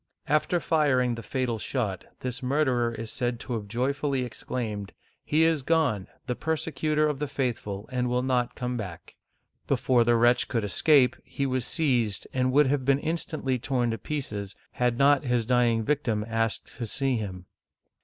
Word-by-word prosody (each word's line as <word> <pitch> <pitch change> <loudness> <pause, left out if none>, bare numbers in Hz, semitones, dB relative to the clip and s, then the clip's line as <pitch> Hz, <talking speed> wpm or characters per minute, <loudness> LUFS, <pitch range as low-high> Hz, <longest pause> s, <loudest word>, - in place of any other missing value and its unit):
After 155 +4 +2
firing 135 -7 +2
the 115 - -5
fatal 120 -1 -2
shot, 105 -7 -2 0.2
this 125 -1 -3
murderer 125 -3 +1
is 115 -1 -5
said 120 -1 -2
to 125 - -4
have 110 -3 -3
joyfully 135 +4 0
exclaimed, 110 -4 -4 0.2
" - - -38
He 155 +2 +2
is 160 -3 +3
gone, 130 - +1 0.2
the 125 - -2
persecutor 155 +2 0
of 150 -3 -2
the 150 - -1
faithful, 115 -7 -3
and 125 -1 0
will 125 +1 +1
not 125 -2 0
come 125 0 -3
back! 90 -7 -7 0.3
" - - -51
Before 125 -2 +3
the 120 0 +3
wretch 120 +1 +4
could 115 -4 -1
escape, 125 - +4
he 140 - -3
was 130 -2 -1
seized, 125 - 0
and 130 0 +1
would 145 +3 +5
.have 135 0 +1
been 135 +1 +3
instantly 155 -4 -2
torn 125 -2 0
to 115 - -3
pieces, 105 -9 -4 0.2
had 125 -2 0
not 140 +1 +4
his 120 -2 +1
dying 120 -2 +3
victim 115 -6 0
asked 115 -1 -2
to 115 - -3
see 135 +2 0
him. 95 -4 -5
125 Hz, 175 wpm, -27 LUFS, 115-140 Hz, 0.3 s, would